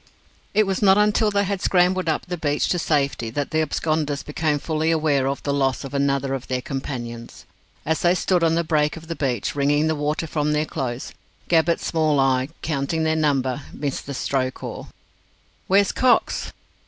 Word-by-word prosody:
It 215 Hz, 0 st, +5 dB
was 195 Hz, -1 st, -2 dB
not 195 Hz, -1 st, +6 dB
until 210 Hz, +1 st, +3 dB
they 200 Hz, -1 st, +1 dB
had 200 Hz, -1 st, -2 dB
scrambled 180 Hz, -1 st, +2 dB
up -, -, -1 dB
the 180 Hz, -, -4 dB
beach 150 Hz, -3 st, 0 dB
to 175 Hz, -, +1 dB
safety 140 Hz, -7 st, 0 dB
that 145 Hz, +4 st, -3 dB
the 155 Hz, -, +2 dB
absconders 155 Hz, -2 st, -1 dB
became 150 Hz, 0 st, -1 dB
fully 155 Hz, +2 st, -1 dB
aware 150 Hz, -4 st, +2 dB
of 140 Hz, 0 st, -3 dB
the 140 Hz, -, -1 dB
loss 135 Hz, -1 st, 0 dB
of 135 Hz, -, -8 dB
another 140 Hz, -1 st, 0 dB
of 135 Hz, -1 st, -5 dB
their 130 Hz, -1 st, -1 dB
companions. 120 Hz, -4 st, -6 dB, 0.4 s
As 160 Hz, 0 st, 0 dB
they 175 Hz, +1 st, +4 dB
stood 180 Hz, -1 st, +1 dB
on 165 Hz, 0 st, +3 dB
the 170 Hz, -, +1 dB
break 150 Hz, -1 st, +1 dB
of 165 Hz, -, -10 dB
the 165 Hz, -, -4 dB
beach, 125 Hz, -8 st, -1 dB
wringing 145 Hz, +2 st, +2 dB
the 160 Hz, -, +1 dB
water 150 Hz, +2 st, -1 dB
from 150 Hz, -1 st, -1 dB
their 150 Hz, +1 st, +1 dB
clothes, 130 Hz, -5 st, -4 dB, 0.4 s
Gabbett's 165 Hz, 0 st, +2 dB
small 155 Hz, -3 st, +1 dB
eye, 130 Hz, 0 st, +2 dB
counting 155 Hz, +1 st, -1 dB
their 160 Hz, 0 st, +1 dB
number, 140 Hz, -3 st, 0 dB
missed 140 Hz, -2 st, -4 dB
the 140 Hz, -, -4 dB
stroke 130 Hz, -1 st, -2 dB
oar. -, -, -6 dB, 0.8 s
"Where's 195 Hz, +1 st, +4 dB
Cox?" 255 Hz, -1 st, +2 dB
150 Hz, 190 wpm, -23 LUFS, 140-165 Hz, 0.8 s, not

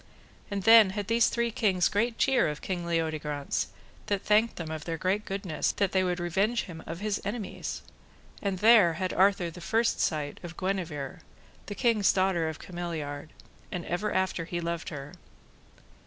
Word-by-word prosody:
And 200 Hz, -2 st, -3 dB
then 225 Hz, -1 st, +8 dB
had 205 Hz, -, -1 dB
these 230 Hz, +1 st, +4 dB
three 235 Hz, -1 st, 0 dB
kings 190 Hz, -5 st, +2 dB
great 230 Hz, +3 st, 0 dB
cheer 265 Hz, -3 st, +3 dB
of 150 Hz, -1 st, -3 dB
King 175 Hz, -2 st, -3 dB
Leodegrance, 155 Hz, -4 st, -1 dB, 0.4 s
that 200 Hz, -2 st, -1 dB
thanked 215 Hz, +2 st, +3 dB
them 160 Hz, -2 st, -5 dB
of 155 Hz, -1 st, -5 dB
their 165 Hz, -1 st, -3 dB
great 190 Hz, +5 st, 0 dB
goodness, 195 Hz, -5 st, -2 dB
that 200 Hz, -2 st, 0 dB
they 190 Hz, -1 st, +2 dB
would 180 Hz, -1 st, -1 dB
revenge 195 Hz, +7 st, +1 dB
him 165 Hz, -4 st, -9 dB
of 165 Hz, +3 st, -6 dB
his 210 Hz, -1 st, -1 dB
enemies; 205 Hz, +1 st, -5 dB, 0.6 s
and 195 Hz, -2 st, -1 dB
there 210 Hz, -4 st, +6 dB
had 185 Hz, +2 st, -2 dB
Arthur 190 Hz, -2 st, +3 dB
the 180 Hz, -, -11 dB
first 225 Hz, +6 st, +1 dB
sight 150 Hz, -3 st, -1 dB
of 170 Hz, -1 st, -9 dB
Guenever, 180 Hz, -4 st, -3 dB, 0.5 s
the 205 Hz, -, -5 dB
king's 225 Hz, -5 st, +3 dB
daughter 185 Hz, -4 st, +1 dB
of 155 Hz, -, -6 dB
Cameliard, 160 Hz, -5 st, -5 dB, 0.4 s
and 180 Hz, -, -4 dB
ever 205 Hz, +5 st, -2 dB
after 190 Hz, -3 st, 0 dB
he 175 Hz, +1 st, -3 dB
loved 170 Hz, -1 st, -3 dB
her. 145 Hz, -2 st, -8 dB
185 Hz, 170 wpm, -28 LUFS, 165-205 Hz, 0.6 s, then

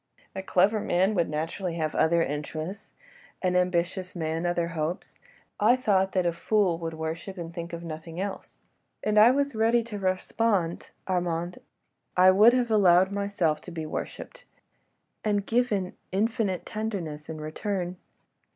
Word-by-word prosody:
A 190 Hz, -, -3 dB
clever 190 Hz, +3 st, +3 dB
man 190 Hz, +1 st, +2 dB
would 170 Hz, -4 st, +1 dB
naturally 165 Hz, +3 st, -3 dB
have 155 Hz, -2 st, -1 dB
other 170 Hz, +1 st, +3 dB
interests, 155 Hz, +7 st, -5 dB, 0.5 s
an 180 Hz, -1 st, +1 dB
ambitious 180 Hz, +1 st, 0 dB
man 165 Hz, 0 st, -2 dB
other 175 Hz, -1 st, 0 dB
hopes.... 165 Hz, +3 st, -4 dB, 0.4 s
I 225 Hz, +4 st, +5 dB
thought 195 Hz, -6 st, +1 dB
that 185 Hz, -2 st, +1 dB
a 170 Hz, -, +1 dB
fool 185 Hz, -1 st, +1 dB
would 165 Hz, -1 st, -4 dB
worship, 160 Hz, +4 st, -5 dB
and 170 Hz, -1 st, -6 dB
think 170 Hz, -1 st, -6 dB
of 170 Hz, 0 st, -6 dB
nothing 165 Hz, +1 st, -7 dB
else. 195 Hz, 0 st, -5 dB, 0.5 s
And 215 Hz, 0 st, +3 dB
I 220 Hz, +3 st, +9 dB
was 280 Hz, +2 st, +1 dB
ready 230 Hz, +2 st, +3 dB
to 220 Hz, -3 st, -6 dB
respond, 185 Hz, -1 st, 0 dB, 0.2 s
Armand; 175 Hz, -1 st, -1 dB, 0.6 s
I 185 Hz, +1 st, +8 dB
would 215 Hz, +5 st, +7 dB
have 245 Hz, -2 st, +1 dB
allowed 190 Hz, -3 st, +5 dB
myself 200 Hz, -6 st, 0 dB
to -, -, -10 dB
be 160 Hz, -2 st, -5 dB
worshipped, -, -, -6 dB, 0.8 s
and 205 Hz, -2 st, 0 dB
given 215 Hz, -6 st, 0 dB, 0.2 s
infinite 200 Hz, -2 st, 0 dB
tenderness 190 Hz, -9 st, -4 dB
in 160 Hz, -1 st, -5 dB
return. 180 Hz, +3 st, -3 dB
185 Hz, 150 wpm, -27 LUFS, 165-205 Hz, 0.8 s, I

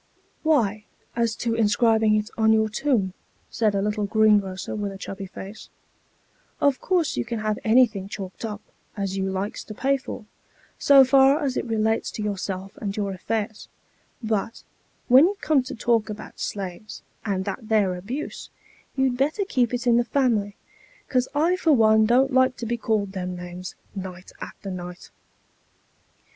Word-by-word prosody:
" -, -, -40 dB
Why, 215 Hz, -7 st, +1 dB, 0.3 s
as 230 Hz, -1 st, +1 dB
to 230 Hz, 0 st, -1 dB
inscribing 220 Hz, 0 st, +3 dB
it 215 Hz, +1 st, -1 dB
on 220 Hz, -1 st, +3 dB
your 220 Hz, 0 st, +3 dB
tomb," 215 Hz, -6 st, 0 dB, 0.4 s
said 215 Hz, -3 st, +1 dB
a 195 Hz, -, +1 dB
little 210 Hz, 0 st, -1 dB
greengrocer 205 Hz, -3 st, +2 dB
with 205 Hz, -1 st, -3 dB
a 195 Hz, -, -8 dB
chubby 195 Hz, 0 st, -7 dB
face, 195 Hz, +3 st, -10 dB, 0.5 s
" -, -, -39 dB
of 270 Hz, -, -5 dB
course 360 Hz, -4 st, +1 dB
you -, -, +1 dB
can 235 Hz, 0 st, -4 dB
have 215 Hz, -1 st, -1 dB
anything 220 Hz, -4 st, +3 dB
chalked 195 Hz, -1 st, -7 dB
up, 210 Hz, -2 st, -4 dB, 0.4 s
as 195 Hz, -1 st, -2 dB
you 190 Hz, 0 st, -1 dB
likes 190 Hz, +2 st, -3 dB
to 215 Hz, -, -9 dB
pay 275 Hz, +4 st, +1 dB
for, 260 Hz, -4 st, -8 dB, 0.5 s
so 275 Hz, -2 st, +7 dB
far 270 Hz, +2 st, +5 dB
as 265 Hz, -3 st, -1 dB
it -, -, -1 dB
relates 220 Hz, 0 st, 0 dB
to 215 Hz, -, -4 dB
yourself 195 Hz, -2 st, -4 dB
and 200 Hz, -1 st, -4 dB
your 200 Hz, -2 st, -1 dB
affairs; 215 Hz, +3 st, -3 dB, 0.6 s
but, 220 Hz, 0 st, -2 dB, 0.4 s
when 260 Hz, +5 st, +8 dB
you 395 Hz, +3 st, 0 dB
come 300 Hz, -4 st, +3 dB
to 255 Hz, -, -7 dB
talk 230 Hz, -1 st, +1 dB
about 210 Hz, 0 st, -8 dB
slaves, 200 Hz, +2 st, -5 dB, 0.2 s
aud 190 Hz, -2 st, -1 dB
that 215 Hz, +3 st, -5 dB
there 205 Hz, -4 st, +3 dB
abuse, 225 Hz, +12 st, -6 dB, 0.5 s
you'd 265 Hz, -2 st, +1 dB
better 300 Hz, +10 st, +1 dB
keep 250 Hz, -, +1 dB
it 245 Hz, 0 st, -3 dB
in 235 Hz, -1 st, +4 dB
the 240 Hz, -, +3 dB
family, 230 Hz, -7 st, +1 dB, 0.5 s
'cos 255 Hz, -1 st, +1 dB
I 330 Hz, +5 st, +3 dB
for 330 Hz, -4 st, +3 dB
one 220 Hz, -3 st, +5 dB
don't 260 Hz, +3 st, +3 dB
like 260 Hz, 0 st, +3 dB
to 235 Hz, -, -5 dB
be 235 Hz, +1 st, -1 dB
called 215 Hz, -4 st, -1 dB
them 180 Hz, -2 st, -4 dB
names, 180 Hz, 0 st, -8 dB, 0.2 s
night 185 Hz, -1 st, -7 dB
after 195 Hz, -, -7 dB
night." 180 Hz, 0 st, -8 dB
220 Hz, 170 wpm, -24 LUFS, 200-245 Hz, 0.6 s, when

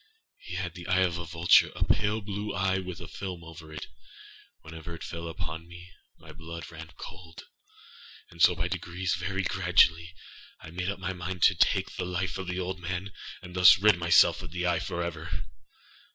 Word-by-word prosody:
He 90 Hz, -, -8 dB
had 90 Hz, -2 st, -3 dB
the 85 Hz, 0 st, -9 dB
eye 95 Hz, 0 st, +3 dB
of 85 Hz, -2 st, 0 dB
a 85 Hz, -, -5 dB
vultureâa 85 Hz, +1 st, +4 dB
pale 105 Hz, +1 st, +1 dB
blue 105 Hz, 0 st, -4 dB
eye, 95 Hz, -1 st, +1 dB
with 90 Hz, -2 st, -6 dB
a -, -, -7 dB
film 90 Hz, -3 st, -6 dB
over 80 Hz, -1 st, -11 dB
it. 80 Hz, -, -6 dB, 0.8 s
Whenever 80 Hz, +1 st, -8 dB
it -, -, -9 dB
fell 85 Hz, 0 st, -6 dB
upon 80 Hz, 0 st, -6 dB
me, 85 Hz, +1 st, -12 dB, 0.3 s
my -, -, -13 dB
blood 85 Hz, +1 st, -9 dB
ran 80 Hz, 0 st, -9 dB
cold; 80 Hz, -2 st, -10 dB, 0.9 s
and 85 Hz, -, -9 dB
so -, -, +7 dB
by -, -, -1 dB
degreesâvery 95 Hz, +2 st, -2 dB
graduallyâI 80 Hz, 0 st, 0 dB
made 90 Hz, +2 st, -2 dB
up 100 Hz, -, -3 dB
my 95 Hz, 0 st, -3 dB
mind 90 Hz, 0 st, -4 dB
to -, -, +7 dB
take -, -, +1 dB
the 90 Hz, -, -2 dB
life 90 Hz, 0 st, -2 dB
of 95 Hz, -, -5 dB
the 90 Hz, +1 st, -2 dB
old 95 Hz, 0 st, -3 dB
man, 95 Hz, +2 st, -4 dB, 0.3 s
and 90 Hz, -1 st, -10 dB
thus 90 Hz, +2 st, +8 dB
rid 105 Hz, -1 st, +5 dB
myself 85 Hz, 0 st, +5 dB
of 90 Hz, -, -8 dB
the 90 Hz, +2 st, -3 dB
eye 85 Hz, -2 st, +2 dB
forever. 85 Hz, -1 st, -4 dB
90 Hz, 180 wpm, -28 LUFS, 85-95 Hz, 0.9 s, thus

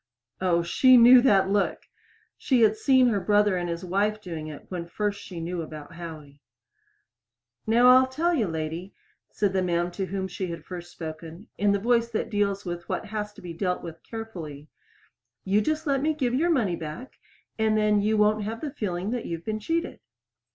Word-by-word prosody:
Oh, 175 Hz, -2 st, +2 dB
she 255 Hz, +9 st, +5 dB
knew 245 Hz, +1 st, +8 dB
that 195 Hz, -6 st, +3 dB
look! 205 Hz, 0 st, 0 dB, 0.5 s
She 255 Hz, -3 st, +1 dB
had 215 Hz, 0 st, +4 dB
seen 255 Hz, +2 st, +4 dB
her 210 Hz, -3 st, +1 dB
brother 205 Hz, +1 st, +3 dB
and 175 Hz, -1 st, -2 dB
his 170 Hz, +2 st, -4 dB
wife 205 Hz, +4 st, 0 dB
doing 165 Hz, -6 st, -6 dB
it 150 Hz, -2 st, -9 dB
when 175 Hz, -2 st, -5 dB
first 205 Hz, +3 st, -3 dB
she 180 Hz, -4 st, -8 dB
knew 170 Hz, +1 st, -3 dB
about 155 Hz, -1 st, -9 dB
Howie. 155 Hz, -4 st, -10 dB, 1.3 s
"Now 235 Hz, +3 st, +5 dB
I'll 255 Hz, +1 st, +7 dB
tell 320 Hz, +7 st, 0 dB
you, 235 Hz, -, +1 dB
lady," 165 Hz, +3 st, -5 dB, 0.3 s
said 205 Hz, -2 st, -1 dB
the 190 Hz, -, +1 dB
man 175 Hz, -1 st, 0 dB
to 190 Hz, +2 st, -4 dB
whom 190 Hz, 0 st, -3 dB
she 185 Hz, 0 st, -4 dB
had 170 Hz, -1 st, -7 dB
first 175 Hz, -1 st, -8 dB
spoken, 160 Hz, +3 st, -9 dB
in 205 Hz, 0 st, +2 dB
the 200 Hz, -, +2 dB
voice 235 Hz, +2 st, +2 dB
that 235 Hz, 0 st, -3 dB
deals 200 Hz, -1 st, 0 dB
with 175 Hz, -1 st, -6 dB
what -, -, -2 dB
has 210 Hz, -1 st, -3 dB
to -, -, -15 dB
be 175 Hz, -1 st, -6 dB
dealt 180 Hz, +1 st, -2 dB
with 165 Hz, -1 st, -9 dB
carefully, 165 Hz, -11 st, -8 dB, 0.7 s
"you 200 Hz, +3 st, +2 dB
just 310 Hz, +6 st, -1 dB
let 275 Hz, -2 st, +1 dB
me 310 Hz, +1 st, +1 dB
give 255 Hz, -5 st, -1 dB
you 255 Hz, -, +1 dB
your 340 Hz, +3 st, +2 dB
money 230 Hz, -, +1 dB
back, 165 Hz, -, -8 dB, 0.4 s
then 215 Hz, -1 st, +2 dB
you 215 Hz, +1 st, +1 dB
won't 210 Hz, +1 st, +3 dB
have 225 Hz, +2 st, -5 dB
the 300 Hz, -, -4 dB
feeling 195 Hz, -6 st, -3 dB
that 245 Hz, -2 st, -3 dB
you've 170 Hz, 0 st, -5 dB
been 215 Hz, -1 st, -2 dB
cheated." 330 Hz, +10 st, -2 dB
200 Hz, 195 wpm, -26 LUFS, 175-230 Hz, 1.3 s, knew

